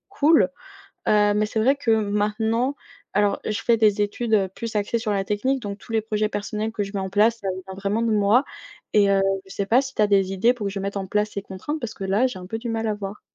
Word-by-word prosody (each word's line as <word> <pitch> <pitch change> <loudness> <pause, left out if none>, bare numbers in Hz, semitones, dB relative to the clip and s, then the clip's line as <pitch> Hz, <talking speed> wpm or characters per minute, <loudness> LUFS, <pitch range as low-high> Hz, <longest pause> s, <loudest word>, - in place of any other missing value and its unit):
cool, 315 -7 +4 0.6
heu, 210 -1 +4
mais 210 +1 +2
c'est 215 - -3
vrai 250 +6 +4
que 275 -5 -2
maintenant 220 +4 +1 0.4
alors, 205 0 +2
et - - -3
je 210 - -4
fais 235 -1 +3
des 210 -2 +3
études, 220 +2 -1
heu, 195 -3 +3
plus 230 -2 -5
axées 210 +3 0
sur 220 -1 -3
la 195 -1 0
technique, 260 +7 0
donc 200 -3 -6
tous 230 - -17
les 220 -1 +1
projets 215 -1 -1
personnels 210 +1 -3
que 220 -2 -3
je 200 - -9
mets 195 - -1
en 190 - -3
place, 220 +4 +3
ça 195 - -3 0.2
vient 190 - -7
vraiment 200 +3 -1
de 230 -1 +1
moi 210 +6 +4 0.5
et 205 -2 +4
heu, 195 0 +3 0.2
je - - -17
sais 200 - -2
pas 235 +6 +4
si 270 -1 -6
tu - - +2
as 210 - +5
des 195 -2 +2
idées 200 +6 +3
pour 230 -5 -5
que 200 - -2
je 200 - -4
mette 200 +1 -4
en 195 - -4
place 210 +2 0
ces 200 - -5
contraintes, 205 +11 -5
parce 230 -4 -5
que 195 - -6
là, 200 +6 +2
j'ai 250 -7 -5
un 180 - -9
peu 225 +4 -4
du 235 +1 -6
mal 225 0 -2
à 215 - 0
voir. 205 0 -7
210 Hz, 280 wpm, -23 LUFS, 200-230 Hz, 0.6 s, as